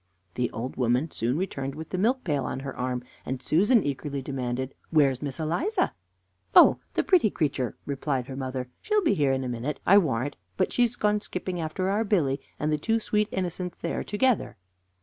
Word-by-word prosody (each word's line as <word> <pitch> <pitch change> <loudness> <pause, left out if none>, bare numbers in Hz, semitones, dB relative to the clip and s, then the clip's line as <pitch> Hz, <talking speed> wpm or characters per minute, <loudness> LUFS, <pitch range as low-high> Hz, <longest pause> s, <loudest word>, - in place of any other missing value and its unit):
The 125 -1 0
old 120 +4 -5
woman 125 +5 +1
soon 120 +5 0
returned 135 -7 -3
with 160 +1 -7
the 185 - -3
milk 250 +6 +2
pail 145 -7 0
on 130 +1 -3
her 135 -1 -6
arm, 125 0 -2 0.2
and 130 0 -3
Susan 205 - +3
eagerly 140 0 -3
demanded: 130 -1 -3 0.2
"Where's 140 -5 +3
Miss 140 -1 -3
Eliza?" 175 - 0 0.6
"Oh, - - +8 0.2
the - - +2
pretty 350 - +4
creature!" 140 - -1
replied 135 -2 -1
her 130 - -7
mother, 130 -1 -4
"she'll 425 -1 +1
be 320 - +3
here 140 -3 +2
in 135 0 0
a - - -3
minute, 125 +4 -3
I 200 +2 +8
warrant 145 - -1
her; - - -33 0.2
but - - +1
she - - +1
has 240 0 +3
gone 210 -2 +1
skipping 180 -3 -4
after 160 +4 -2
our 210 +3 +2
Billy, 155 -11 +1 0.2
and 150 +1 0
the 150 - 0
two 225 +8 +1
sweet 210 -1 0
innocents 180 -1 -3
they 170 - -3
are - - -2
together." 235 +3 +1
150 Hz, 205 wpm, -27 LUFS, 130-195 Hz, 0.6 s, Oh